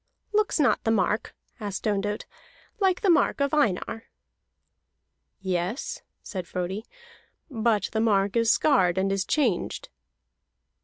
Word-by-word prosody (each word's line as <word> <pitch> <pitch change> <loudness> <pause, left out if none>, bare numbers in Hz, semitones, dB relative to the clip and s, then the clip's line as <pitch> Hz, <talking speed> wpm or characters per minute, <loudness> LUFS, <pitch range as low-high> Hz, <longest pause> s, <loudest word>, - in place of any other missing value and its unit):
"Looks 420 -4 +2
not 285 - +3
the - - 0
mark," 210 0 0 0.2
asked 205 -3 -5
Ondott, 205 0 -1 0.5
"like 380 -3 +2
the 400 - +2
mark 330 - +3
of 280 0 0
Einar?" 225 -5 0 1.4
"Yes," 190 - -2 0.2
said 185 -4 -6
Frodi, 185 +5 -4 0.6
"but 225 -3 +1
the 220 - 0
mark 200 -2 +2
is 230 -1 +3
scarred, 190 - +3
and 195 +1 +1
is 195 0 0
changed." 245 - 0
215 Hz, 120 wpm, -26 LUFS, 195-275 Hz, 1.4 s, not